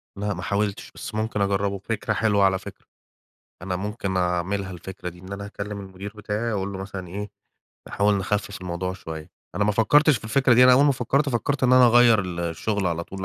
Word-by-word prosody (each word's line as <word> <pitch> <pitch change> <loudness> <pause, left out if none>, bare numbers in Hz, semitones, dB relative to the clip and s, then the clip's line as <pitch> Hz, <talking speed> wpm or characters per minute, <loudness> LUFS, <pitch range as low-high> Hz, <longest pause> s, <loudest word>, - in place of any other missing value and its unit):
لأ، 105 +1 -2
ما 90 - -6
حاولتش، 100 +2 -2
بس 105 - -7
ممكن 110 -1 -1
أجرّبه 100 0 0
فكرة 110 0 -2
حلوة 105 -2 +2
على 95 -1 +3
فكرة، - - -11 0.8
أنا 90 0 -2
ممكن 100 0 -3
أعملها 90 +2 -1
الفكرة 90 0 -7
دي، 90 0 -11
إن 95 +2 -10
أنا 100 +1 -5
هاكلم 100 0 -6
المدير 95 +1 -8
بتاعي 105 +2 -2
وأقول 100 -1 -2
له 95 - -6
مثلًا 95 -1 -7
إيه؟ 100 +3 -6 0.6
نحاول 100 +1 +2
نخفف 100 0 -2
الموضوع 90 0 -3
شوية 80 -4 -8 0.2
أنا 105 - +1
ما 105 - +2
فكّرتش 145 +8 +4
في - - -16
الفكرة 125 +2 +3
دي، 125 +2 +7
أنا 125 - +8
أول 135 +3 +6
ما 145 - +4
فكّرت، 135 +3 0
فكّرت 135 +2 -1
إن 125 - +4
أنا 130 -1 +7
أغيّر 120 -2 +6
ال 90 -2 -5
الشُغل 90 +4 -2
على 85 -1 -2
طول 95 +1 -7
100 Hz, 210 wpm, -24 LUFS, 95-110 Hz, 0.8 s, أنا